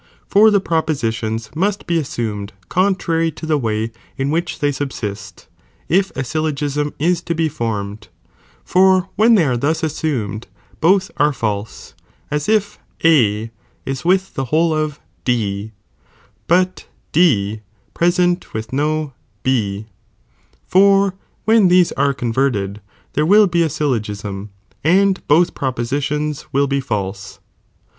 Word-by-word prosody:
For 215 Hz, +2 st, +6 dB
the 205 Hz, -1 st, +4 dB
propositions 115 Hz, -, -2 dB
must 200 Hz, +4 st, -1 dB
bu 170 Hz, -1 st, +1 dB
assumed 110 Hz, -7 st, -4 dB, 0.2 s
eontrary 180 Hz, -3 st, +1 dB
to 160 Hz, -, -7 dB
the 155 Hz, -1 st, +1 dB
way 110 Hz, -2 st, -1 dB, 0.3 s
in 135 Hz, +1 st, -1 dB
which 170 Hz, +2 st, -1 dB
they 145 Hz, 0 st, +1 dB
subsiat, 105 Hz, -9 st, -5 dB, 0.4 s
if 190 Hz, +3 st, +3 dB
a 135 Hz, -, 0 dB
ayl 155 Hz, +4 st, -1 dB
logism 145 Hz, 0 st, -2 dB
is 170 Hz, +3 st, +1 dB
to 170 Hz, -1 st, -3 dB
be 160 Hz, 0 st, +1 dB
formed,^ 105 Hz, -, -4 dB, 0.6 s
for 185 Hz, 0 st, +3 dB
when 225 Hz, +2 st, +5 dB
they 180 Hz, -7 st, +4 dB
are 130 Hz, -3 st, +1 dB
thus 150 Hz, +7 st, 0 dB
assumed 125 Hz, -9 st, -2 dB, 0.3 s
both 190 Hz, +3 st, +3 dB
are 150 Hz, +1 st, +3 dB
false, 105 Hz, -5 st, -4 dB, 0.4 s
as 150 Hz, +3 st, -1 dB
if 210 Hz, -1 st, +1 dB, 0.3 s
A 115 Hz, -8 st, +3 dB, 0.3 s
is 135 Hz, -1 st, -4 dB
with 190 Hz, +2 st, +1 dB
the 135 Hz, -, -2 dB
whole 160 Hz, +5 st, +2 dB
of 155 Hz, -1 st, -2 dB, 0.2 s
D, 110 Hz, -4 st, -1 dB, 0.8 s
but 180 Hz, +2 st, +1 dB, 0.2 s
D 110 Hz, -, +2 dB, 0.3 s
pvesent 175 Hz, +1 st, +2 dB, 0.2 s
witli 110 Hz, +3 st, -5 dB
no 150 Hz, +1 st, -1 dB, 0.3 s
B, 110 Hz, -5 st, 0 dB, 0.8 s
for 195 Hz, 0 st, +4 dB, 0.3 s
when 220 Hz, -3 st, +5 dB
these 180 Hz, -1 st, +4 dB
are 140 Hz, 0 st, +1 dB
converted, 115 Hz, -5 st, -1 dB, 0.3 s
there 150 Hz, -, +1 dB
will 210 Hz, +3 st, +7 dB
be 175 Hz, -2 st, +1 dB
a 165 Hz, -, +2 dB
syllogism, 105 Hz, -8 st, -3 dB, 0.3 s
and 190 Hz, +4 st, +3 dB
both 165 Hz, +4 st, +4 dB
propositions 140 Hz, +4 st, -2 dB
will 140 Hz, +1 st, +2 dB
be 140 Hz, 0 st, 0 dB
false. 100 Hz, -6 st, -4 dB
145 Hz, 135 wpm, -19 LUFS, 115-175 Hz, 0.8 s, will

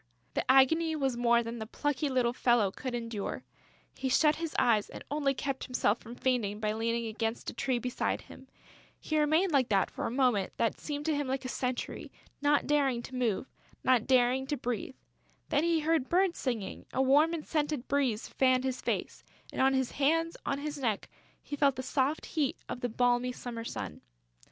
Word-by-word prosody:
The -, -, -2 dB
agony 320 Hz, +5 st, +4 dB
was 270 Hz, -4 st, 0 dB
more 235 Hz, 0 st, +3 dB
than 230 Hz, +1 st, -5 dB
the 220 Hz, -, -5 dB
plucky 290 Hz, +3 st, -1 dB
little 250 Hz, -2 st, +1 dB
fellow 240 Hz, -6 st, +3 dB
could 255 Hz, +4 st, -5 dB
endure. 230 Hz, -4 st, -4 dB, 0.5 s
He 265 Hz, -, -2 dB
shut 300 Hz, +3 st, +4 dB
his 330 Hz, -1 st, -4 dB
eyes 215 Hz, -4 st, +3 dB
and -, -, -9 dB
only 285 Hz, -2 st, +1 dB
kept 270 Hz, 0 st, -3 dB
himself 240 Hz, -3 st, +1 dB
from 235 Hz, +2 st, -10 dB
fainting 235 Hz, -6 st, 0 dB
by 215 Hz, -1 st, 0 dB
leaning 230 Hz, +1 st, -1 dB
against 225 Hz, +1 st, -3 dB
a -, -, -14 dB
tree 260 Hz, -2 st, 0 dB
beside 250 Hz, +1 st, -2 dB
him. -, -, -14 dB, 0.5 s
He 310 Hz, -1 st, -1 dB
remained 315 Hz, +5 st, +3 dB
like 265 Hz, -4 st, +3 dB
that 195 Hz, -3 st, +2 dB
for -, -, -3 dB
a -, -, -2 dB
minute 245 Hz, -6 st, +1 dB
that 230 Hz, -, 0 dB
seemed 295 Hz, -1 st, -4 dB
to 315 Hz, -2 st, +1 dB
him 285 Hz, -1 st, -1 dB
like 265 Hz, 0 st, -2 dB
a -, -, -3 dB
century, 250 Hz, 0 st, -3 dB, 0.3 s
not 290 Hz, 0 st, +3 dB
daring 275 Hz, -5 st, +1 dB
to 260 Hz, -, -8 dB
move, 240 Hz, -5 st, 0 dB, 0.4 s
not 255 Hz, -3 st, +3 dB
daring 255 Hz, +1 st, +3 dB
to 290 Hz, 0 st, -1 dB
breathe. 245 Hz, +1 st, -3 dB, 0.5 s
Then 290 Hz, +1 st, +2 dB
he 335 Hz, -1 st, +2 dB
heard 315 Hz, -4 st, +1 dB
birds 365 Hz, 0 st, +2 dB
singing; 235 Hz, -7 st, -3 dB
a -, -, -3 dB
warm 285 Hz, +5 st, +5 dB
and 315 Hz, -, -6 dB
scented 295 Hz, -4 st, -1 dB
breeze 265 Hz, -6 st, 0 dB
fanned 255 Hz, -1 st, +2 dB
his 260 Hz, -1 st, -2 dB
face; -, -, -3 dB, 0.3 s
and, -, -, -1 dB
on 265 Hz, 0 st, +4 dB
his 260 Hz, -2 st, 0 dB
hands, 330 Hz, +4 st, +1 dB
on 275 Hz, -, 0 dB
his 290 Hz, 0 st, -5 dB
neck, 225 Hz, -6 st, -1 dB, 0.3 s
he 290 Hz, -, -5 dB
felt 280 Hz, -2 st, +3 dB
the 260 Hz, -, -4 dB
soft 275 Hz, +3 st, 0 dB
heat 295 Hz, -5 st, -1 dB
of 245 Hz, -, -5 dB
the 245 Hz, -, -1 dB
balmy 245 Hz, +2 st, +2 dB
summer 235 Hz, -2 st, -6 dB
sun. -, -, -6 dB
260 Hz, 195 wpm, -30 LUFS, 235-290 Hz, 0.5 s, warm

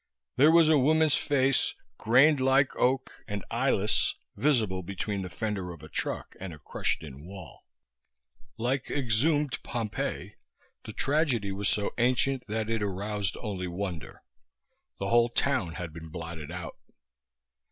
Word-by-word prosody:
There 145 Hz, +4 st, +6 dB
was 165 Hz, -1 st, +6 dB
a 155 Hz, -2 st, +5 dB
woman's 155 Hz, +2 st, +4 dB
face, 135 Hz, -2 st, +2 dB, 0.2 s
grained 135 Hz, +6 st, +5 dB
like 135 Hz, +1 st, +3 dB
oak 130 Hz, +1 st, 0 dB
and 105 Hz, -2 st, -4 dB
eyeless, 115 Hz, -4 st, +1 dB, 0.2 s
visible 110 Hz, -10 st, +1 dB
between 100 Hz, +2 st, -3 dB
the 90 Hz, -, -5 dB
fender 95 Hz, +1 st, -3 dB
of 85 Hz, -4 st, -11 dB
a -, -, -10 dB
truck -, -, -4 dB
and 95 Hz, -1 st, -6 dB
a 80 Hz, -, -9 dB
crushed 75 Hz, -, -2 dB
in 70 Hz, -2 st, -10 dB
wall. 95 Hz, -3 st, -11 dB, 0.9 s
Like 125 Hz, +3 st, -1 dB
exhumed 145 Hz, +3 st, +1 dB
Pompeii, 115 Hz, -3 st, -4 dB, 0.5 s
the -, -, -7 dB
tragedy 135 Hz, -9 st, +1 dB
was 100 Hz, +1 st, -1 dB
so 105 Hz, -1 st, 0 dB
ancient 130 Hz, +2 st, +1 dB
that 110 Hz, 0 st, -2 dB
it 115 Hz, -1 st, -1 dB
aroused 100 Hz, 0 st, -2 dB
only 95 Hz, -5 st, -3 dB
wonder. 90 Hz, -3 st, -5 dB, 0.7 s
The 100 Hz, -, -3 dB
whole 120 Hz, 0 st, +4 dB
town 120 Hz, -9 st, 0 dB
had 85 Hz, -2 st, -6 dB
been 80 Hz, 0 st, -9 dB
blotted 80 Hz, -1 st, -7 dB
out. 90 Hz, -2 st, -6 dB
110 Hz, 140 wpm, -28 LUFS, 95-135 Hz, 0.9 s, There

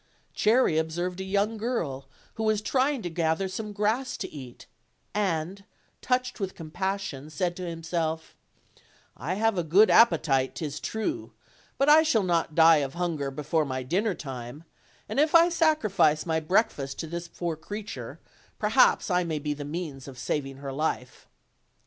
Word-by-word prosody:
Cherry 215 Hz, -7 st, +3 dB
observed 175 Hz, +3 st, -3 dB
a -, -, -3 dB
young 200 Hz, +3 st, 0 dB
girl 165 Hz, -, -3 dB, 0.3 s
who 220 Hz, -, -6 dB
was 215 Hz, -1 st, +2 dB
trying 265 Hz, -1 st, +1 dB
to 175 Hz, -, -3 dB
gather 160 Hz, +3 st, 0 dB
some 210 Hz, +3 st, -5 dB
grass 215 Hz, +6 st, -1 dB
to 195 Hz, -, -4 dB
eat, 130 Hz, -5 st, -10 dB, 0.5 s
and, 190 Hz, -1 st, -1 dB, 0.4 s
touched 250 Hz, -1 st, -1 dB
with 195 Hz, -2 st, -3 dB
compassion, 170 Hz, -3 st, -4 dB
said 175 Hz, +3 st, -2 dB
to 180 Hz, -2 st, -4 dB
himself: 165 Hz, -1 st, -3 dB, 0.8 s
"I 160 Hz, +9 st, -3 dB
have 220 Hz, -2 st, +1 dB
a -, -, 0 dB
good 190 Hz, +8 st, +5 dB
appetite, 135 Hz, -, +4 dB
'tis 150 Hz, -2 st, -4 dB
true, 320 Hz, +10 st, -3 dB, 0.4 s
but 275 Hz, -, +2 dB
J 305 Hz, +2 st, +8 dB
shall 235 Hz, -10 st, +2 dB
not 170 Hz, -3 st, 0 dB
die 165 Hz, -1 st, +7 dB
of 140 Hz, 0 st, -2 dB
hunger 165 Hz, -6 st, -2 dB
before 150 Hz, +3 st, -1 dB
my 130 Hz, -2 st, -3 dB
dinner 190 Hz, -, 0 dB
time, 130 Hz, +1 st, -8 dB, 0.4 s
and -, -, -2 dB
if 305 Hz, +2 st, +3 dB
I 335 Hz, +1 st, +7 dB
sacrifice 220 Hz, -, +2 dB
my 160 Hz, -1 st, +1 dB
breakfast 155 Hz, -5 st, 0 dB
to -, -, -4 dB
this 170 Hz, +2 st, -5 dB
poor 170 Hz, -1 st, -4 dB
creature, 205 Hz, +6 st, -7 dB, 0.4 s
perhaps 470 Hz, -, +3 dB
I 180 Hz, 0 st, +3 dB
may 160 Hz, -2 st, -2 dB
be 150 Hz, 0 st, -2 dB
the 145 Hz, 0 st, -7 dB
means 145 Hz, -4 st, -5 dB
of 135 Hz, -2 st, -10 dB
saving 135 Hz, +1 st, -3 dB
her 135 Hz, -1 st, -6 dB
life." 135 Hz, -4 st, -3 dB
175 Hz, 160 wpm, -27 LUFS, 150-215 Hz, 0.8 s, J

